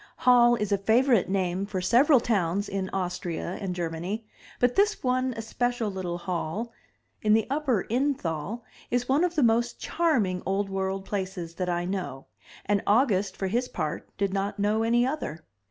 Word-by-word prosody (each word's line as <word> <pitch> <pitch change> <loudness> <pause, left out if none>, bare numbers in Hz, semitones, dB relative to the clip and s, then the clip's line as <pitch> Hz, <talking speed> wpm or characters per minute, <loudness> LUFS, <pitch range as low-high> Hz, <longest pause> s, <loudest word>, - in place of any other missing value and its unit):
Hall 240 -1 +6
is 210 -3 -2
a 200 - +2
favorite 230 +1 +3
name 190 0 0
for 195 -2 -3
several 245 - +5
towns 200 -4 0
in 190 -1 -3
Austria 180 -1 -3
and 185 -3 -3
Germany; 175 +6 -3 0.3
but 245 0 +3
this 415 +1 +2
one 255 0 +1
especial 235 0 -1
little 180 -2 -3
Hall, 180 +6 -3 0.5
in 215 0 +3
the 220 0 +3
Upper 275 -9 +1
Innthal, 230 - -1 0.3
is 245 0 0
one 280 +5 +3
of 355 -1 0
the 300 - +3
most 235 +1 +2
charming 230 - +1
Old 195 +1 -1
World 190 0 -2
places 185 -4 -4
that 180 +1 -3
I 175 0 -1
know, 175 -8 -4 0.4
and 205 -1 +1
August 205 -4 +2
for 195 - -2
his 240 +6 0
part 155 +2 -4
did 200 -1 0
not 200 +1 -1
know 210 +2 +1
any 235 +2 +3
other. 255 - -4
205 Hz, 170 wpm, -27 LUFS, 185-240 Hz, 0.5 s, Hall